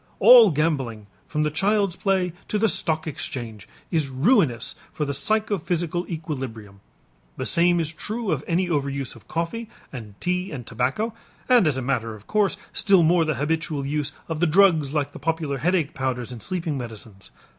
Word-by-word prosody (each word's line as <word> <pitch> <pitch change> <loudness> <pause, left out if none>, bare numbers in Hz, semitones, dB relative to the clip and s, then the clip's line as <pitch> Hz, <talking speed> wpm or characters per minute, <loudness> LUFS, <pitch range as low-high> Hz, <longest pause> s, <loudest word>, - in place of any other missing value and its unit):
All 240 -4 +9
gambling 135 - -1 0.2
from 150 -1 -1
the 150 - 0
child's 195 +2 +1
play 190 -4 0
to 210 - -1
the 225 +2 +3
stock 160 -4 +2
exchange 120 -8 -6 0.2
is 160 -4 +1
ruinous 135 - +2 0.2
for 150 - -2
the 140 - -2
psychophysical 175 0 -1
equilibrium. 130 - -6 0.6
The - - -3
same 175 +1 +3
is 160 -1 -1
true 215 +5 -4
of 150 -2 -1
any 175 +2 +1
overuse 140 -5 -2
of 115 - -17
coffee 170 +8 -3 0.2
and 105 -6 -9
tea 180 +1 -1
and 130 -6 -6
tobacco, 135 - -1 0.3
and 245 -8 +5
as 140 -3 +1
a 130 - -3
matter 115 -4 -1
of 105 -1 -15
course 210 -2 +1 0.2
still 195 -4 +4
more 165 +1 +4
the 155 -2 0
habitual 150 0 -2
use 145 0 -2 0.2
of 160 -2 -3
the 175 - +3
drugs 160 -4 +4
like 145 -2 -1
the - - -10
popular 155 -3 -2
headache 170 0 +1
powders 130 -2 -3
and 120 -3 -8
sleeping 165 -6 -3
medicines. 110 -4 -9
155 Hz, 175 wpm, -24 LUFS, 130-180 Hz, 0.6 s, All